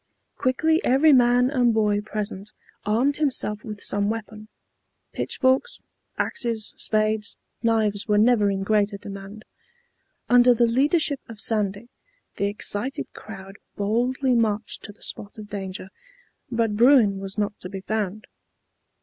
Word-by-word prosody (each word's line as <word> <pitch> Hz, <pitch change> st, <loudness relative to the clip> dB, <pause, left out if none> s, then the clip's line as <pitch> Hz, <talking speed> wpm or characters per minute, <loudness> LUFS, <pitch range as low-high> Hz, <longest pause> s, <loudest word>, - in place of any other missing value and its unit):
Quickly 315 Hz, +5 st, +1 dB
every 285 Hz, +5 st, +5 dB
man 245 Hz, 0 st, +4 dB
and 245 Hz, -5 st, +2 dB
boy 210 Hz, -2 st, +2 dB
present 210 Hz, -1 st, -5 dB, 0.3 s
armed 250 Hz, +7 st, +2 dB
himself 250 Hz, -8 st, -1 dB
with 210 Hz, -3 st, -7 dB
some 205 Hz, 0 st, 0 dB
weapon; 215 Hz, -1 st, -6 dB, 0.7 s
pitchforks, 265 Hz, -, 0 dB, 0.4 s
axes, 230 Hz, -3 st, -2 dB
spades, 215 Hz, 0 st, -1 dB, 0.3 s
knives 220 Hz, -3 st, +1 dB
were 210 Hz, -1 st, +3 dB
never 215 Hz, -1 st, +4 dB
in 195 Hz, -1 st, -1 dB
greater 205 Hz, 0 st, +1 dB
demand. 200 Hz, +1 st, -9 dB, 0.8 s
Under 245 Hz, 0 st, +6 dB
the 235 Hz, +1 st, +4 dB
leadership 285 Hz, +4 st, +2 dB
of 225 Hz, -2 st, -10 dB
Sandy, 210 Hz, 0 st, -1 dB, 0.5 s
the 200 Hz, -, 0 dB
excited 205 Hz, +4 st, -3 dB
crowd 195 Hz, -2 st, -10 dB, 0.2 s
boldly 245 Hz, +6 st, 0 dB
marched 220 Hz, -2 st, 0 dB
to 210 Hz, -, -8 dB
the 205 Hz, -, -19 dB
spot 205 Hz, -, -7 dB
of 210 Hz, -1 st, -10 dB
danger, 190 Hz, -2 st, -6 dB, 0.6 s
but 230 Hz, -3 st, 0 dB
Bruin 230 Hz, -4 st, +5 dB
was 195 Hz, +1 st, -7 dB
not 205 Hz, -1 st, -2 dB
to 180 Hz, -, -7 dB
be 195 Hz, 0 st, -6 dB
found. 210 Hz, +1 st, -3 dB
215 Hz, 130 wpm, -24 LUFS, 205-245 Hz, 0.8 s, Under